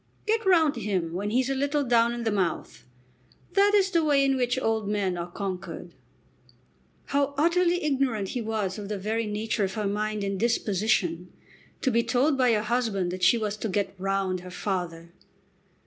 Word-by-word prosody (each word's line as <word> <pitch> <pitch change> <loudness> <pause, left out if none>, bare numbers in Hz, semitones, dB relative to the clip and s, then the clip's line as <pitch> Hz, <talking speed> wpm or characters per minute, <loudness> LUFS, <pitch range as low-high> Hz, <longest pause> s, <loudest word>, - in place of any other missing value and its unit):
"Get 445 +1 +1
round 320 -7 +4
him 185 -7 -2
when 200 +4 -2
he's 250 +3 +1
a 270 - 0
little 285 +2 0
down 235 -2 +3
in 240 0 -4
the 225 - 0
mouth. 185 -5 -2 0.7
That 400 +2 +4
is 390 -1 +3
the 335 -3 +2
way 285 -2 +3
in 270 0 +2
which 250 0 0
old 220 -4 -1
men 200 -3 0
are 175 0 -5
conquered." 190 0 -6 1.1
How 280 0 0
utterly 345 +3 +2
ignorant 260 -9 0
he 245 - -3
was 215 -3 -2
of 205 -1 -7
the 210 - -2
very 220 +3 -2
nature 215 +1 -1
of 190 - -5
her 215 -1 -2
mind 210 +1 -1
and 195 -1 -2
disposition! 200 -6 0 0.5
To 265 - +1
be 235 0 +3
told 250 +6 +2
by 255 -2 +3
her 210 -1 +1
husband 215 -6 0
that 185 0 -6
she 185 +6 +5
was 215 -2 -2
to 220 - -3
"get 200 +1 -1
round" 195 -1 -1
her 180 +1 -10
father! 175 -3 -4
220 Hz, 185 wpm, -26 LUFS, 195-265 Hz, 1.1 s, she